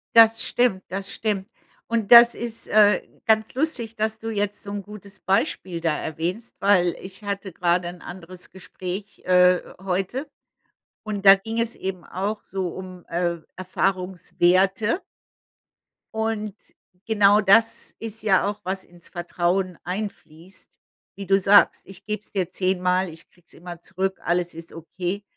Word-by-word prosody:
Das 225 0 +7
stimmt, 220 -6 +1
das 195 +1 -5
stimmt. 205 -3 -2 0.4
Und 230 -1 -1
das 235 0 +10
ist, 235 -1 -6
äh, 210 -1 +5 0.2
ganz 220 0 +2
lustig, 250 -7 -1
dass 220 0 -2
du 225 - -5
jetzt 205 -1 -2
so 200 - -7
'n 205 -1 -4
gutes 200 -1 -12
Beispiel 185 -2 -1
da 165 -3 0
erwähnst, 175 +9 -5
weil 185 -4 +3
ich 190 +2 -9
hatte 200 -1 -4
gerade 175 +1 0
ein 175 0 -8
anderes 180 0 -10
Gespräch, 190 +1 -7
äh, 180 -1 +5 0.2
heute. 195 +10 -2 0.7
Und 205 -2 -5
da 195 0 +10
ging 225 +4 -5
es 230 0 -1
eben 190 -2 -5
auch 205 +3 -4
so 190 -2 -3
um, 185 0 -9
äh, 170 0 -1 0.2
Erfahrungswerte. 185 - +1 1.1
Und 220 -2 -2 0.5
genau 210 -1 +4
das 225 +3 +3
ist 225 0 -6
ja 195 -1 +3
auch, 205 0 -6
was 190 +1 -3
ins 175 -1 -15
Vertrauen 175 +1 -1
einfließt, 180 -2 -8 0.4
wie 200 - -7
du 195 +1 +4
sagst. 200 +1 +5
Ich 195 0 -13
geb's 210 0 -5
dir 185 -3 -1
10 185 -1 -1
mal, 180 0 +1
ich 165 +1 -13
krieg's 175 -2 -19
immer 175 0 -10
zurück, 190 +2 -3
alles 175 0 0
ist 165 0 -10
okay. 180 +4 -5
195 Hz, 150 wpm, -23 LUFS, 180-210 Hz, 1.1 s, das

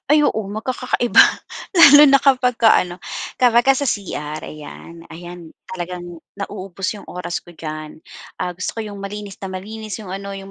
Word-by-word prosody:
Ay 300 0 +5
oo, 220 -7 0
magkakakaiba, 240 +3 -1 0.6
lalo 295 -4 +9
na 275 0 +6
kapagka 250 -4 +3
ano, 180 0 +2 0.4
kapagka 245 +1 +4
sa 285 - -2
CR, 155 -8 -4
ayan. 165 +2 -10
Ayan, 175 0 -10 0.2
talagang 175 -2 -7 0.2
nauubos 195 -1 -6
yung 205 - -10
oras 175 -1 -4
ko - - -15
diyan. 155 -2 -8 0.4
Ah, 180 -1 -3
gusto 185 +5 -5
ko - - -1
yung 200 - -9
malinis 200 0 -7
na 195 - -5
malinis, 215 +3 -7
yung 190 -4 -8
ano, 200 0 -6
yung 195 0 -11
195 Hz, 160 wpm, -20 LUFS, 175-230 Hz, 0.6 s, lalo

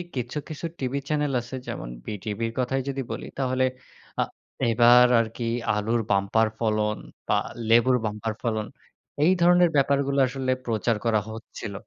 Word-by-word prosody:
কিছু, 125 +3 -3
কিছু 155 +2 -6
TV 135 +1 -1
channel 150 -2 +1
আছে 125 +2 -8
যেমন - - -5 0.2
বিটিভির 110 +2 -3
কথাই 130 +1 0
যদি 135 0 -2
বলি - - -5
তাহলে 130 -1 +1 0.6
আ - - +4 0.5
এবার 120 +2 +7
আরকি 115 +1 -2 0.3
আলুর 110 +3 0
বাম্পার 100 +3 +3
ফলন 110 -1 +1 0.3
বা - - +3 0.3
লেবুর 120 +2 +5
বাম্পার 105 +1 -3
ফলন 110 -3 -1 0.6
এই 170 - +5
ধরনের 175 0 +6
ব্যাপারগুলো 140 0 +2
আসলে 130 0 -2
প্রচার 115 -1 0
করা 110 -2 +3
হচ্ছিল। 110 -1 -8
120 Hz, 140 wpm, -25 LUFS, 110-135 Hz, 0.6 s, এবার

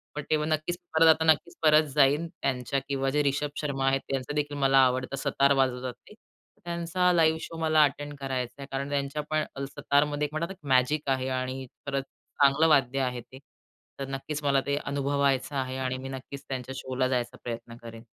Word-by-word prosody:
पण 150 - -3
तेव्हा 155 0 +1
नक्कीच 155 +3 -1 0.2
परत 160 0 +6
आता 160 0 +5
नक्कीच 160 +2 +2
परत 155 0 +6
जाईल 145 +4 +4
त्यांच्या 135 -2 -2
किंवा 135 -1 0
जे 150 +2 +1
रिषभ 145 +1 0
शर्मा 135 -2 -1
आहेत. 135 0 +2
त्यांचादेखील 145 +2 -2
मला 135 -1 +3
आवडतं. 130 +1 -1
सतार 140 0 +3
वाजवतात 130 -2 0
ते. - - -13 0.5
त्यांचा 170 +1 +1
लाईव्ह 160 -1 +4
शो 165 - -7
मला 155 -1 +4
अटेंड 145 +1 -1
करायचाय 135 0 -4
कारण 140 +1 -3
त्यांच्यापण 150 +2 -1 0.3
सतारमध्ये 145 +1 +1 0.4
मॅजिक 135 +3 +2
आहे. 130 0 0
आणि 130 +1 -3 0.2
परत 140 -1 -1 0.4
चांगलं 140 +3 +5
वाद्य 135 -3 +3
आहे 125 -2 -1
ते. 130 +3 -14 0.6
तर 135 - -4
नक्कीच 145 +2 -5
मला 140 -1 +3
ते 140 0 0
अनुभवायचं 140 0 0
आहे. 130 -1 -2
आणि 130 0 -2
मी 135 +1 -7
नक्कीच 135 +1 -8
त्यांच्या 130 0 -5
शोला 130 0 -1
जायचा 125 -2 -2
प्रयत्न 115 -1 -6
करेन. 115 0 -10
140 Hz, 170 wpm, -28 LUFS, 130-150 Hz, 0.6 s, परत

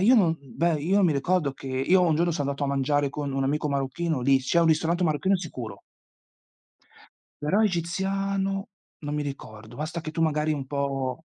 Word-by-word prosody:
beh 190 - +2
io 250 +4 +7
non 170 -8 +4
beh 160 +5 0
io 195 +6 +2
mi 170 -4 +4
ricordo 145 +1 +1
che 135 - -12
io 135 +8 +3
un 165 -3 +3
giorno 170 +2 +2
sono 145 -4 -1
andato 140 +1 -4
a - - -1
mangiare 140 +1 +1
con 140 -1 -4
un 135 0 0
amico 150 +2 0
marocchino 140 +2 -1
lì, 135 +1 +4
c'è 150 +6 +1
un 165 - +4
ristorante 165 +3 +2
marocchino 170 +5 +2
sicuro. 125 - -7 1.6
Però 195 +9 +2
egiziano, 195 +2 -1 0.3
non 145 -1 -5
mi 150 - -1
ricordo, 110 -5 -8
basta 155 +3 -4
che 155 - -5
tu 165 - -4
magari 155 -1 +1
un 140 -3 -4
po' 140 +1 -2
150 Hz, 190 wpm, -26 LUFS, 140-175 Hz, 1.6 s, io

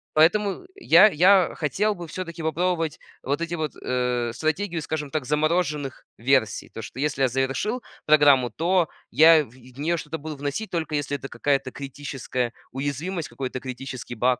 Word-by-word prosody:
Поэтому 195 - +3
я 210 - +6
я 185 +2 +5
хотел 205 +7 0
бы 175 -2 -8
всё-таки 170 -1 -6
попробовать 165 0 0 0.2
вот 140 +4 -1
эти 170 0 -3
вот, 155 -4 -3
э, 125 -2 -1
стратегию, 165 +3 -1
скажем 150 -2 -4
так, 155 -5 -2
замороженных 150 -2 0
версий. 120 -2 +1
То, 115 - -8
что 125 - -9
если 145 -1 -1
я - - +5
завершил 135 - -1 0.2
программу, 145 -5 +5
то 170 +4 +2 0.2
я 160 0 +7
в - - -18
в 130 +1 -17
нее 170 +3 0
что-то 160 +1 -5
буду 155 0 -7
вносить, 145 +10 -4
только 160 -3 -2
если 145 0 -1
это 140 - -8
какая-то 135 -3 0
критическая 135 -3 -4 0.2
уязвимость, 145 +6 -3
какой-то 130 -1 -5
критический 130 -1 -7
баг. 125 +2 +2
150 Hz, 165 wpm, -24 LUFS, 135-170 Hz, 0.2 s, я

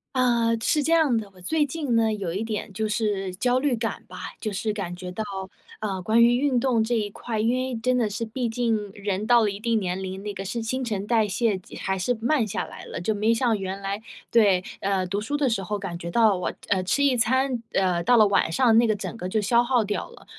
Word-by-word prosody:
呃， 235 -2 +2
是 300 - +2
这 320 +3 0
样 315 -7 +4
的， 220 -3 -2
我 - - -16
最 310 - +1
近 285 -4 -2
呢， 225 -1 +3
有 195 -5 -3
一 200 +4 -2
点 220 -2 -4
就 220 +2 -1
是 205 -3 -1
焦 250 +6 +2
虑 270 -3 +1
感 225 0 -3
吧， - - -11 0.2
就 215 - -2
是 215 +2 -2
感 190 -4 -4
觉 180 0 -7
到， 220 +5 -3 0.6
呃， 195 -3 -3
关 220 +5 +4
于 240 +1 +5
运 265 -2 +2
动 235 -3 +2
这 240 +2 0
一 215 -2 0
块， 225 +1 -4
因 225 +3 +2
为 255 0 -2
真 250 +3 +1
的 225 -3 +1
是， 210 +3 -3
毕 235 +2 -3
竟 225 -3 -1
人 205 +1 -2
到 240 -1 +6
了 210 - +1
一 200 - -7
定 230 0 +1
年 185 -1 -3
龄， 190 +1 -5
那 205 -1 -4
个 195 0 -6
是 225 +4 -3
新 260 +4 -2
陈 210 -5 -2
代 220 -1 +2
谢 220 +1 +1
即 180 - -13
还 190 0 -2
是 245 +7 0
慢 240 0 +1
下 195 - -2
来 - - -11
了， - - -6
就 195 +6 0
没 215 +2 +1
像 230 -1 +2
原 190 0 -4
来 200 +1 -4 0.3
对， 200 -5 +4 0.2
呃， 195 -1 0
读 200 +3 -2
书 290 +7 -2
的 290 -2 +1
时 225 -4 0
候 205 +2 -3
感 185 -4 -6
觉 170 - -5
到 220 +1 +4
我 180 - -2 0.2
呃， 195 -2 +2
吃 190 +10 +1
一 275 -2 +4
餐， 255 +1 +1
呃， 180 -3 +2
到 245 +4 +5
了 215 - +7
晚 195 -4 +2
上 230 +5 +4
那 235 - +4
个 215 - +2
整 205 - -6
个 180 -3 -4
就 215 - +1
消 235 +3 +3
耗 245 -1 +2
掉 205 0 -3
了。 - - -16
220 Hz, 275 characters per minute, -25 LUFS, 195-240 Hz, 0.6 s, 了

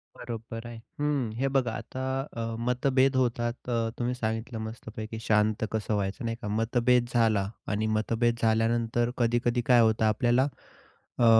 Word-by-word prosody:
बरोबर 115 -1 -7
आहे. 120 -1 -8 0.2
हं, 145 -6 0
हे 135 +2 +1
बघा 125 -4 +2
आता 130 0 -6 0.3
अ, 115 -1 -3
मतभेद 130 +2 +2
होतात 120 -1 -1
अ, 115 -1 +1
तुम्ही 120 +1 0
सांगितलं 115 0 -3
मस्तपैकी 110 0 -6
शांत 110 0 +2
कसं 110 0 -1
व्हायचं 100 +5 -2
नाही 115 0 -2
का. 105 - -4
मतभेद 120 +3 +2
झाला 110 -4 +2 0.2
आणि 110 +1 0
मतभेद 115 +2 +1
झाल्यानंतर 115 +1 +2
कधी-कधी 120 0 +1
काय 120 - +7
होतं 110 0 +3
आपल्याला 120 +5 +3 0.7
अ, 120 - +5
115 Hz, 145 wpm, -28 LUFS, 110-120 Hz, 0.7 s, काय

